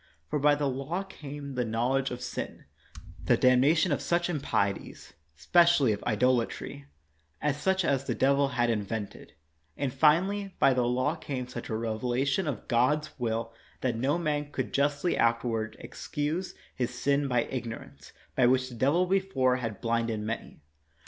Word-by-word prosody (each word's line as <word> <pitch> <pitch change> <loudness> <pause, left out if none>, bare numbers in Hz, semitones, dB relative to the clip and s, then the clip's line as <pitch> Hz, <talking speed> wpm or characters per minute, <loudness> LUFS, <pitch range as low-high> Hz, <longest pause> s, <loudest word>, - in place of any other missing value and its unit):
For 150 - +1
by 145 +1 +4
the 145 0 -1
law 140 +8 -2
came 145 -6 -8
the 125 -1 0
knowledge 120 +4 0
of 125 0 -6
sin, - - -5 0.6
the - - +3
damnation 140 +7 +4
of 145 - 0
such 175 +1 0
im 160 - -1
30 - - -6
KNOX - - -8 0.3
pieties, - - -13 0.2
specially 170 - +4
of 105 - -6
idolatry, 115 - 0 0.5
and 150 -1 0
such 190 +4 +1
as 135 -3 +1
the - - -1
devil 140 +1 +3
had 120 -3 +1
invented; 105 -1 -4 0.4
and, 135 -3 -2
finally, 185 +8 +2
by 135 - +5
the 125 -1 +1
law 130 +5 +1
came 130 -6 -5
such 125 - -7
a 110 - -1
revelation 125 - -1
of 130 -8 -4
God 130 +6 +2
s - - -12
will 115 -1 -2 0.3
that 125 -3 0
no 135 +7 +1
man 150 -3 -2
could - - -3
justly 145 +5 +1
afterward 115 -1 0
excuse 155 +6 -4 0.2
his 125 -2 -1
sin 140 +2 +1
by 125 -3 +2
ignorance, 115 - -7 0.2
by 125 -2 +4
which 130 0 +2
the 125 - -9
devil 145 +9 +2
before 180 -10 +1
had 115 -5 -5
blinded 115 -1 0
many. 110 -6 -5
130 Hz, 170 wpm, -29 LUFS, 120-150 Hz, 0.6 s, by